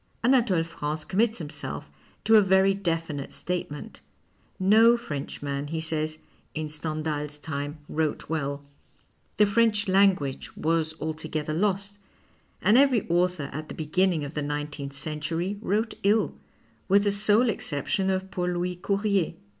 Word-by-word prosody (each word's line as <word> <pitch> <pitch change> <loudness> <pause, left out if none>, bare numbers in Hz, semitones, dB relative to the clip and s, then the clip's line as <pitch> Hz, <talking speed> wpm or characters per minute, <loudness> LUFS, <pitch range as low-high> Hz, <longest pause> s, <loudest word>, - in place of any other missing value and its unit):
xVnatole 230 -9 +3
France 155 -2 -4
commits 220 +4 +1
himself 150 - -6 0.4
to 220 +1 +5
a 215 - +9
very 190 0 +4
definite 165 -7 -2
statement. 175 -5 -5 0.6
No 220 +5 +6
Frenchman, 145 -6 -4
he 160 +2 -3
says, 155 -1 -1 0.4
in 155 -1 -3
Stendhals 150 -1 -3
time 145 0 -4
wrote 155 -1 -1
well, 145 -2 -3 0.7
the 210 - +6
French 210 0 +2
language 185 -8 +2
was 160 0 0
altogether 155 -1 -3
lost, 200 +3 -1 0.6
and 220 +5 +6
every 270 -6 +3
author 175 -3 +1
at 155 +1 -6
the - - -6
beginning 165 +1 +1
of 145 +1 -6
the 150 - -2
nineteenth 145 -1 -4
century 160 +6 -3
wrote 220 +2 0
ill, 210 +3 +2 0.5
with 200 +1 +5
the 205 - +2
sole 210 +4 +3
exception 190 0 -1
of 190 0 -1
Paul 180 0 -1
Louis 175 0 -2
Courier. 200 -1 0
170 Hz, 135 wpm, -26 LUFS, 150-200 Hz, 0.7 s, a